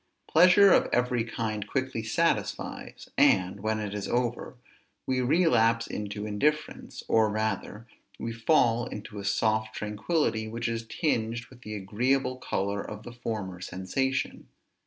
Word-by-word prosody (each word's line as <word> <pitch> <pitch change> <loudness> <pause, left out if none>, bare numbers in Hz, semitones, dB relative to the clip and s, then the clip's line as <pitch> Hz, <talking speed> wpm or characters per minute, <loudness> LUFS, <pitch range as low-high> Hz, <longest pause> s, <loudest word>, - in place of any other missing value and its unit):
Pleasure 185 +4 +7
of - - +3
every 125 -1 +1
kind 110 -2 -3
quickly 130 -4 -2
satisfies; 165 +10 -2
and, 95 +2 +4
when 110 +2 -1
it 105 -2 -4
is 105 -1 -4
over, 120 +3 -1 0.5
we 130 -1 0
relapse 120 -6 +3
into 105 0 -5
indifference, 145 +9 -1
or, 110 -1 +4
rather, 110 0 -3 0.3
we 115 - -4
fall 115 -1 +2
into 105 0 -7
a - - -6
soft 110 +2 0
tranquillity 110 +2 -1
which 115 +2 -3
is 115 0 -3
tinged 115 -7 -1
with 125 -1 -16
the 105 -3 -6
agreeable 125 +6 0
color 100 -4 -2
of 105 +1 -8
the 120 - -9
former 105 -7 -5
sensation. 130 +10 -2
115 Hz, 135 wpm, -28 LUFS, 105-125 Hz, 0.5 s, Pleasure